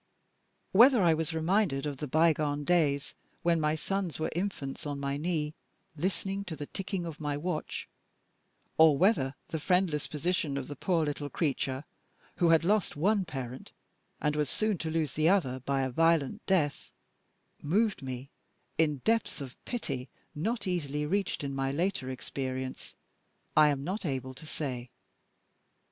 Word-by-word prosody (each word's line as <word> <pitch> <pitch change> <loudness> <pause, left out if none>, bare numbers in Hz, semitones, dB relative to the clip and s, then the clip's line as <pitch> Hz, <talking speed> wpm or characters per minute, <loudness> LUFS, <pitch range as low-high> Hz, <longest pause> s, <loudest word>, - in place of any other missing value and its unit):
Whether 235 +1 +7
I 170 -2 +6
was 160 +1 -1
reminded 160 -4 +1
of 145 -2 -3
the 150 - -4
bygone 150 -1 +2
days 145 -4 +2 0.3
when 170 -1 +3
my 150 0 +2
sons 190 +1 -2
were 155 - -1
infants 170 -7 -3
on 145 -1 -3
my 140 0 -1
knee, 150 -1 -1 0.4
listening 195 +4 -2
to 170 -4 -5
the 145 0 -5
ticking 190 +1 -4
of 160 -2 -6
my 145 -2 -1
watch 155 0 -3 0.9
or 160 -3 +7
whether 145 -8 +3
the 160 - -2
friendless 180 -3 +1
position 155 -2 -1
of 135 - -4
the 145 - -6
poor 165 +1 +1
little 145 -1 -3
creature, 135 -4 -1 0.5
who 170 - +4
had 165 0 +5
lost 205 +1 +2
one 195 +6 +2
parent 130 -4 -6 0.5
and 150 0 +1
was 150 -2 0
soon 215 -4 0
to 160 - -2
lose 160 -4 0
the 155 +2 +3
other 135 -10 +2
by 135 +1 0
a 130 - -1
violent 165 - +2
death, 165 -7 +1 0.7
moved 205 +7 +1
me 130 0 -6 0.5
in 150 -4 +2
depths 225 0 +1
of 135 -3 -7
pity 140 - -3 0.2
not 220 +10 -2
easily 150 -5 -1
reached 195 0 0
in 140 -1 -3
my 135 0 0
later 160 -3 -1
experience 130 0 -5 0.6
I 155 0 +7
am 140 -2 0
not 190 +8 -3
able 130 -5 -2
to 155 +4 -12
say. 130 -6 -4
155 Hz, 155 wpm, -30 LUFS, 140-180 Hz, 0.9 s, Whether